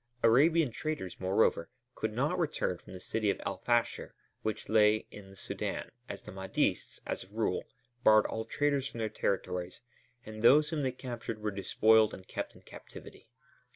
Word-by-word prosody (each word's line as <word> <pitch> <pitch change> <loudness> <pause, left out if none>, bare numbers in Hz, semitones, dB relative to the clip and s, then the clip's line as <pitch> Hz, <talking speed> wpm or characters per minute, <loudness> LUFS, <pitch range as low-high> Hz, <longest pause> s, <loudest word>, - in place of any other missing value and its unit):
Arabian 145 +5 +5
traders, 140 - -4
moreover, 95 -2 +2 0.2
could 110 - -2
not 145 +11 0
return 155 - 0
from 85 - -15
the 90 - -7
city 110 +2 -1
of - - 0
El 95 - -2
Fasher 120 -1 0 0.3
which 110 - -3
lay 110 0 +4
in 100 -2 -11
the 95 - -14
Sudân, - - -4 0.2
as - - -7
the - - -9
Mahdists, 95 0 -1
as - - -3
a - - -23
rule, - - -1 0.4
barred 110 0 +6
all 110 - -3
traders 140 +1 0
from 125 - -9
their 110 -1 -1
territories, 90 -2 -2 0.4
and 110 0 -8
those 145 +6 +6
whom 155 -2 -1
they 130 -2 0
captured 120 -3 -6
were 105 0 -2
despoiled 110 +2 +4
and 95 - -14
kept - - -5
in - - -17
captivity. - - -12
110 Hz, 175 wpm, -31 LUFS, 100-130 Hz, 0.4 s, barred